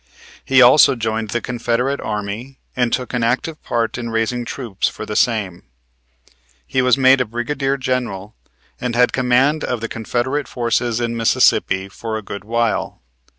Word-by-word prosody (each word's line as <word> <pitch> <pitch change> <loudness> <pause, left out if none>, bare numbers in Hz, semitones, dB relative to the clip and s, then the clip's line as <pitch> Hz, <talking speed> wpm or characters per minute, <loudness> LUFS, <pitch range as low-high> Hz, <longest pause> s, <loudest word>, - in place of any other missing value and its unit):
He 135 -1 +5
also 130 +2 +7
joined 110 -2 -2
the 120 +2 -2
Confederate 125 +3 -1
Army 110 +5 -5 0.2
and 125 -2 +1
took 125 -1 -2
an 125 - 0
active 130 +7 -1
part 115 0 -1
in 120 -1 -4
raising 115 +2 -1
troops 115 -7 -3
for - - -8
the 105 - -5
same. 105 -8 0 1.0
He 130 - 0
was 125 0 +3
made 135 0 +5
brigadier 135 +4 -2
general, 120 -6 -3 0.4
and 125 -2 -3
had 125 0 +3
command 130 +4 +2
of 125 -2 -2
the 115 - -4
Confederate 120 +6 -2
forces 120 -1 -1
in 115 -1 -2
Mississippi 95 -4 +2
for 110 +3 -5
a 110 - -7
good 100 0 -7
while. 115 +1 -1
120 Hz, 155 wpm, -19 LUFS, 110-130 Hz, 1.0 s, also